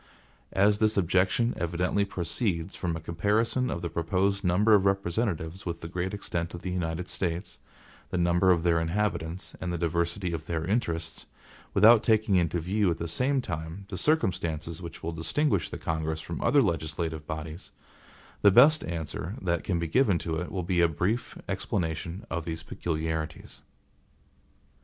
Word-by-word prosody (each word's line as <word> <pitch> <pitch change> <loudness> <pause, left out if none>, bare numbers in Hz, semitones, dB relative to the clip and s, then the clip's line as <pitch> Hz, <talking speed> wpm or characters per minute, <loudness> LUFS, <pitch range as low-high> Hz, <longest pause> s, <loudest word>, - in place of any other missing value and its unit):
As 100 +2 +4
this 110 -1 +2
objection 95 +5 +2
evidently 90 +4 0
proceeds 85 -1 -2
from 85 -2 -2
a - - -6
comparison 105 +10 0
of 85 - -3
the 85 - -2
proposed 95 +4 0
number 100 +5 +4
of 100 -2 +6
representatives 95 -2 -1
with 85 -1 -4
the 85 - -5
great 90 +2 -3
extent 85 -4 -3
of 85 - -9
the 90 - -3
United 85 0 -2
States, 90 +1 -3 0.5
the - - -2
number 85 +1 +3
of 85 -2 +4
their 85 -1 +3
inhabitants, 85 0 -2
and 90 - -2
the 85 - -1
diversity 85 +2 -1
of 80 -1 -5
their 80 -1 -2
interests, 85 -6 -2 0.5
without 110 +3 +8
taking 110 -3 +3
into 85 -1 +2
view 95 +4 +1
at 85 - 0
the 85 - -3
same 130 - +1
time 85 -1 -5
the 95 - -5
circumstances 85 - 0
which 85 -2 -9
will 85 - -2
distinguish 90 - 0
the - - -5
Congress 80 -1 -2
from 85 +1 -6
other 145 -2 +4
legislative 80 -3 -2
bodies, 80 +2 -6 0.7
the 100 - +7
best 140 +10 +6
answer 85 +3 -4
that 85 -3 -1
can 90 - 0
be 85 - -1
given 105 - +3
to 80 -1 -3
it 90 +2 -4
will 95 -2 -2
be 90 0 +1
a 85 - +6
brief 90 +9 -2
explanation 85 +2 -3
of 85 0 -3
these 80 0 -5
peculiarities. 80 -1 -4
85 Hz, 165 wpm, -28 LUFS, 80-100 Hz, 0.7 s, without